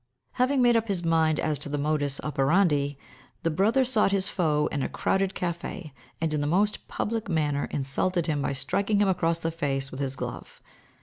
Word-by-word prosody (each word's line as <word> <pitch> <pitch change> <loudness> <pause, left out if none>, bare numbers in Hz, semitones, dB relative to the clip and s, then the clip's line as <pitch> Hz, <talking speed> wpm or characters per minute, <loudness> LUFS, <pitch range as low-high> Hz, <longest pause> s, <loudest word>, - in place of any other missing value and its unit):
Having 255 +1 +2
made 240 -1 +5
up 230 0 +1
his 190 -4 -1
mind 160 -2 +2
as 150 -3 0
to 145 - -5
the 145 - -2
modus 145 -1 0
operandi, 145 -1 +1 0.5
the 165 - +1
brother 220 +11 +3
sought 220 -5 +2
his 195 -1 +1
foe 150 -5 +1
in 140 - -2
a - - -1
crowded 195 0 0
café, 170 -2 -4 0.3
and 160 -1 -1
in 150 - 0
the 145 - -1
most 205 +6 +1
public 220 -1 -3
manner 150 -4 0
insulted 160 +6 0
him 150 -3 -1
by 140 - -1
striking 195 +11 0
him 205 - +3
across 170 -3 +1
the 165 - -1
face 135 -4 -2
with 130 - -7
his 135 -1 -2
glove. - - -7
165 Hz, 195 wpm, -27 LUFS, 145-195 Hz, 0.5 s, made